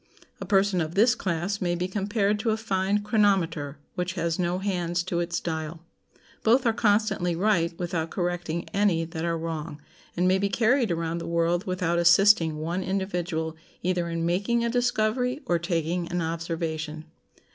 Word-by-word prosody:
A - - -5
person 195 -3 +3
of 160 +2 -4
this 220 +3 +5
class 185 +3 -2
may 175 -1 0
be 180 +1 -2
compared 205 +1 0
to 225 - 0
a 220 - +1
fine 205 -1 0
chronometer 190 - +1 0.2
which 180 -1 -2
has 170 -1 -1
no 175 0 0
hands 175 -3 -1
to 175 -1 -2
its 170 0 -1
dial; 160 0 -4 0.6
both 245 +4 +3
are 230 - +3
constantly 205 -5 +1
right 170 -3 +1
without 170 -2 -2
correcting 175 -2 -2
any 195 -5 +1
that 165 0 -6
are 170 -1 0
wrong, 160 -2 -5 0.4
and 180 +1 +3
may 185 +1 +3
be 200 +1 0
carried 235 +3 +2
around 165 0 -1
the - - -6
world 170 +3 0
without 180 -2 0
assisting 175 -2 +5
one 170 +4 -2
individual 180 -4 -2 0.3
either 175 -1 0
in 165 0 -2
making 200 +7 +1
a 235 - 0
discovery 245 +2 0
or 175 -1 +1
taking 170 0 -1
an 175 +1 -2
observation. 160 -2 -3
175 Hz, 170 wpm, -26 LUFS, 165-200 Hz, 0.6 s, this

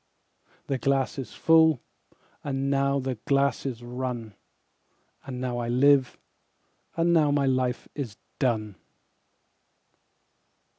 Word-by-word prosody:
17The 135 -2 -2
glass 135 0 0
is 130 - -6
full, 160 -3 +4 0.6
and 135 -1 -1
now 140 0 +2
the 130 -4 -3
glass 140 0 +1
is 120 -2 -5
run,18And 125 +1 -9
now 125 -1 -3
I 120 - -3
live, 130 +1 +4 0.8
and 170 +1 +3
now 155 -3 +4
my 145 -1 +2
life 130 -1 0
is 125 -8 -6 0.2
done. 110 -7 -1
135 Hz, 105 wpm, -26 LUFS, 125-140 Hz, 0.8 s, full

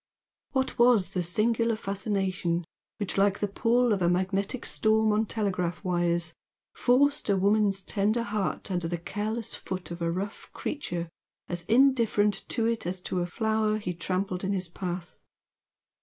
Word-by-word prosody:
What 265 -2 -1
was 240 -5 +5
the 180 - -1
singular 225 +6 +1
fascination 195 -4 -1 0.3
which 200 -2 0
like 200 0 +3
the 205 - -1
"pull" 235 +3 +2
of 195 - -1
a 175 - +3
magnetic 195 +6 0
storm 220 0 +2
on 215 +1 +1
telegraph 185 -5 -1
wires, 175 -2 0 0.4
forced 285 +2 +2
a 200 - +4
woman's 200 0 +2
tender 215 +4 +1
heart 205 -2 -2
under 175 -2 -1
the 175 +1 -2
careless 210 +6 -3
foot 185 -2 -6
of 170 0 -6
a 165 0 +1
rough 195 +4 -5
creature 175 - -3 0.4
as 175 -1 -4
indifferent 230 -5 +3
to 230 -2 0
it 230 -5 0
as 185 +1 -3
to 180 - -2
a 175 - -1
flower 220 +2 +1
he 190 -4 -3
trampled 185 +1 -2
in 195 +1 0
his 185 -3 -2
path? 175 0 -6
200 Hz, 155 wpm, -28 LUFS, 180-220 Hz, 0.4 s, was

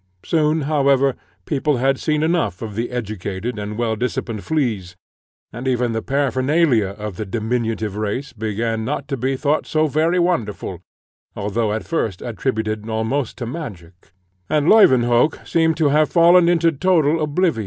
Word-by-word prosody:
Soon, 155 -1 +1
however, 140 -2 +2 0.3
people 145 -1 0
had 135 +2 +1
seen 150 -1 0
enough 160 - 0
of 110 -2 -6
the 115 +4 -3
educated 110 -1 -4
and 105 +1 -5
well 115 -2 0
disciplined 115 -2 -3
fleas; 110 - -2 0.6
and 120 +4 -5
even 125 -2 +1
the 115 0 -2
paraphernalia 135 - +1
of 105 -3 -6
the - - -3
diminutive 110 0 -2
race 110 +6 -3
began 110 0 -2
not 140 +3 -3
to 140 - -2
be 130 +1 -1
thought 150 +3 0
so 155 0 +1
very 155 +4 +1
wonderful, 170 - -1 0.5
although 105 +2 -1
at 110 +1 -3
first 110 - -2
attributed 110 -1 -3
almost 110 +4 -2
to 120 - -4
magic, 100 - -8 0.4
and 150 0 +1
Leuwenhock 130 - +4
seemed 160 -2 +1
to 155 -3 +3
have 150 +2 +3
fallen 175 0 +6
into 170 -1 +3
total 160 -1 +2
oblivion. 155 -2 +1
125 Hz, 155 wpm, -20 LUFS, 110-155 Hz, 0.6 s, fallen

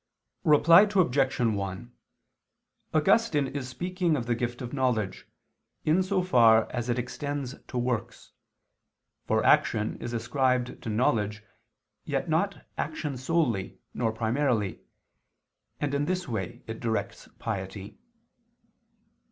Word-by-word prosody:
Reply 165 +4 +7
Obj. 140 -7 +2
1: 105 0 -1 1.0
Augustine 155 -2 +3
is 140 -3 -5
speaking 180 +3 -1
of 120 -5 -2
the 120 - +1
gift 120 +1 -3
of 120 - -6
knowledge, 125 -8 -1 0.6
in 160 +5 +4
so 185 0 0
far 115 -10 +5
as 120 -1 -3
it 120 - +1
extends 140 +2 -4
to 125 - -5
works; 120 -2 -3 1.0
for - - +1
action 110 -1 +3
is 120 - -4
ascribed 125 +1 0
to - - -5
knowledge, 105 -3 0 0.6
yet - - -2
not - - 0
action 145 -3 -3
solely, 130 - -1 0.2
nor 115 -2 0
primarily: 115 -2 0 1.0
and 145 -1 -1
in 140 +1 +1
this 185 +1 -2
way 110 -7 -4
it 110 0 -6
directs 115 -2 -3
piety. 100 -1 -5
125 Hz, 120 wpm, -28 LUFS, 110-145 Hz, 1.0 s, Reply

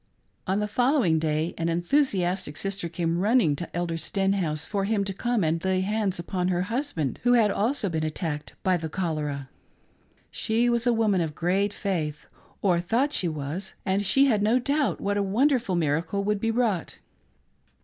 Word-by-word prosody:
On 190 +2 +1
the 210 - -1
following 245 - +2
day, 155 +1 -1
an 165 0 0
enthusiastic 180 - 0
sister 195 -3 -3
came 170 0 -1
running 210 - +3
to 170 +3 -6
Elder 170 -1 -1
Stenhouse 185 -4 -1
for 200 -2 -1
him 205 -1 +1
to 195 -1 -3
come 240 +1 0
and 165 +1 0
lay 190 0 +1
hands 205 -1 -1
upon 180 +1 -2
her 180 -1 +1
husband 235 - -2
who 245 0 +3
had 225 -4 +4
also 220 +3 0
been 160 -3 -2
attacked 155 -1 -4
by 185 -1 +3
the 160 -1 -5
cholera. 150 -6 -3 0.8
She 235 +2 +1
was 235 +1 +1
a - - +5
woman 215 -5 +2
of 155 -2 -3
great 190 +5 +1
faith, 160 -8 -3 0.4
or 180 -4 +3
thought 240 +12 0
she 180 - +1
was, 155 +4 -4
and 195 +1 +1
she 270 +8 +5
had 220 -7 +2
no 220 +4 +3
doubt 280 +3 0
that 205 0 +1
a - - +2
wonderful 235 +1 +1
miracle 165 +4 0
would 210 0 0
be 225 +2 0
vvrought. 225 -7 0
190 Hz, 180 wpm, -26 LUFS, 165-220 Hz, 0.8 s, a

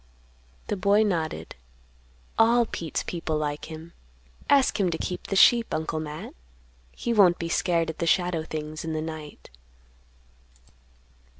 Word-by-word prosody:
The - - -2
boy 200 +3 +3
nodded. 170 -7 -2 0.8
"All 235 +1 +5
Pete's 165 -7 -4
people 165 -3 -3
like 150 -1 -3
him. 160 +1 -10 0.6
Ask 275 -5 +4
him 190 -3 +2
to 165 - -2
keep 180 +2 -5
the 195 - -2
sheep, 235 +4 +5
Uncle 160 0 -2
Matt. 155 0 -7 0.6
He 235 - -3
won't 190 -5 +5
be 170 - -4
scared 165 -1 +1
at 160 - -18
the 170 - -1
shadow 175 -1 +2
things 155 -1 -6
in 160 -1 -3
the 155 - -2
night." 155 - -8
165 Hz, 140 wpm, -26 LUFS, 155-195 Hz, 0.8 s, All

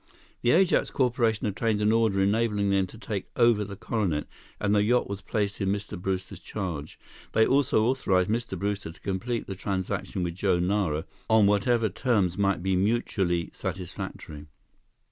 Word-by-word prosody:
The 120 - +2
Ajax 180 +6 +4
Corporation 120 -4 +1
obtained 105 +1 0
an 105 +1 +3
order 110 -4 +2
enabling 105 0 +1
them 95 -1 +2
to 115 - -13
take 105 -2 -5
over 115 -3 +4
the 100 0 -7
Coronet, 95 -8 -1 0.3
and 105 0 +1
the 105 - +4
yacht 120 +4 +2
was 100 0 -5
placed 105 -2 -2
in 95 - +1
Mr. 105 +1 -3
Brewster's 95 0 -3
charge. 85 -8 -5 0.4
They 110 - +5
also 135 -5 +3
authorized 105 -7 +2
Mr. 115 -4 -2
Brewster 100 -2 -3
to 80 - -17
complete 110 +5 -2
the 95 - -5
transaction 95 -1 -3
with 85 -1 -2
Joe 95 0 +1
Nara 90 -4 0 0.2
on 110 -2 +6
whatever 110 +3 +3
terms 100 -4 +1
might 100 -3 +1
be 95 0 +1
mutually 95 -4 0
satisfactory. 85 -5 -6
100 Hz, 165 wpm, -27 LUFS, 95-110 Hz, 0.4 s, on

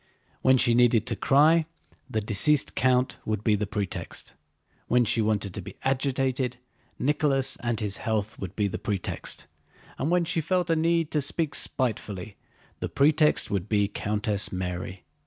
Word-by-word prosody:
When 130 0 +5
she 120 -1 +3
needed 120 -2 +4
to 120 -2 -2
cry, 155 - +4 0.4
the 110 - -1
deceased 115 +8 +3
count 125 0 +1
would 110 -1 -3
be 110 - +3
the 105 0 0
pretext. 100 -2 -5 0.5
When 125 0 +3
she 115 +1 +1
wanted 105 -3 0
to 100 - -4
be 95 +3 -10
agitated, 130 -1 0 0.4
Nicholas 135 -2 +1
and 120 -2 -2
his 105 -3 -1
health 110 -1 -2
would 95 -2 -6
be 105 -2 +1
the 95 - -5
pretext, 100 -3 -3 0.5
and 140 - 0
when 175 0 +2
she 165 0 0
felt 180 +1 0
a - - +3
need 165 0 +1
to 150 - +1
speak 150 +2 -1
spitefully, 105 -6 -1 0.4
the - - -3
pretext 150 -2 +3
would 100 0 -2
be 105 -2 +2
Countess 105 0 -1
Mary. 90 0 -5
120 Hz, 160 wpm, -26 LUFS, 105-140 Hz, 0.5 s, When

